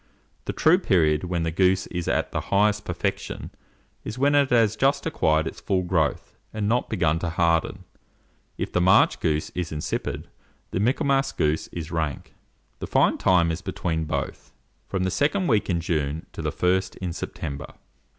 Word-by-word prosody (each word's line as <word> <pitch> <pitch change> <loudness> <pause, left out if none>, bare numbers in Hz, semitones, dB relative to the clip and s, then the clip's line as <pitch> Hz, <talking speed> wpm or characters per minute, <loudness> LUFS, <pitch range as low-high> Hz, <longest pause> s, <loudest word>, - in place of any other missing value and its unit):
The - - -2
true 170 +4 +4
period 80 - +2
when 85 -2 -1
the 80 - -1
goose 95 +2 +2
is 90 -1 -3
in - - +2
the - - -2
highest 105 +1 +1
perfection 90 -1 -3 0.5
is 110 - -6
when 140 +2 +3
it 140 -2 +4
has 115 -3 +3
just 135 +4 +1
acquired 80 - +1
its - - -6
full 95 -2 0
growth, 85 -5 -1 0.2
and 105 -1 -2
not 120 +3 +1
begun 80 0 +1
to 85 - -2
harden; 85 +3 +1 0.7
if - - -3
the 90 - +1
March 95 +2 +5
goose 75 -1 -1
is 90 -2 -4
insipid, 75 -1 -3 0.4
the - - -1
Michaelmas 135 +4 +1
goose 75 +1 0
is 80 -1 -7
rank. 80 -5 -3 0.5
The - - -5
fine - - +2
time 85 -3 +3
is 80 - -4
between 80 -1 -2
both; - - -4 0.4
from 95 -2 -2
the 95 - 0
second 165 - +1
week 110 -11 +1
in 85 -2 +1
June 80 -2 -2
to - - -6
the - - -1
first 95 +1 0
in 90 -3 -4
September." 70 -2 -6
90 Hz, 175 wpm, -25 LUFS, 80-105 Hz, 0.7 s, March